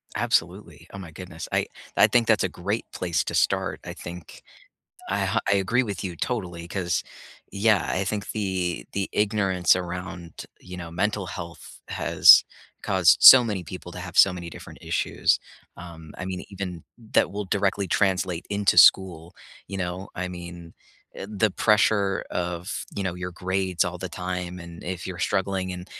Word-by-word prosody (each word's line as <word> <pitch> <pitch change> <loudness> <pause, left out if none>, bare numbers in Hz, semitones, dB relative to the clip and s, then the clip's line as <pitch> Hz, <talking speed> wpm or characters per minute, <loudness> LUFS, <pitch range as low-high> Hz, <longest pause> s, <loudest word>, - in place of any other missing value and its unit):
Absolutely. - - -1
Oh - - -7
my 90 -4 -9
goodness. 85 -1 -9
I - - +1 0.3
I - - +7
think 120 -2 +2
that's - - +3
a - - 0
great - - -3
place 85 -2 -1
to - - -4
start. - - 0
I - - -7
think 85 -1 -10 0.7
I - - 0
h - - 0
I 100 - +4
agree 115 +7 +1
with 100 -5 -5
you 90 - -4
totally 90 -8 -4
'cause, 90 -3 -1 0.5
yeah, 105 -1 +2
I 95 +1 -1
think 105 +1 -3
the 95 - -2
the 100 -1 -2
ignorance 100 -4 +2
around, 90 -1 -6 0.2
you 90 0 -10
know, 85 -2 -7
mental 100 +2 -1
health 85 -3 -9
has - - +6 0.4
caused - - +4
so 130 -2 +11
many 105 -6 -3
people 90 +1 -9
to - - -8
have 90 -1 -8
so 95 - +7
many 85 -1 -7
different - - -11
issues. - - 0 0.4
Um, 85 -3 -11
I 90 - -5
mean, 95 -1 -5
even 90 -4 -6 0.3
that - - +3
will 105 0 -4
directly 100 -1 0
translate 95 -3 0
into 100 0 +2
school. 85 -3 +5 0.3
You 100 - -6
know? 90 +1 -4
I 90 +1 -4
mean, 85 -1 -9 0.4
eh, 95 - -7
the 105 0 +1
pressure 105 -1 +2
of, 90 0 -4
you 100 - -3
know, 95 -2 -2
your 90 0 -6
grades 95 -1 -1
all 90 0 -4
the 95 - -5
time 90 0 -5
and 85 0 -11
if 90 0 -5
you're 90 -2 -6
struggling 95 0 -1
in 90 0 -7
90 Hz, 175 wpm, -25 LUFS, 85-100 Hz, 0.7 s, so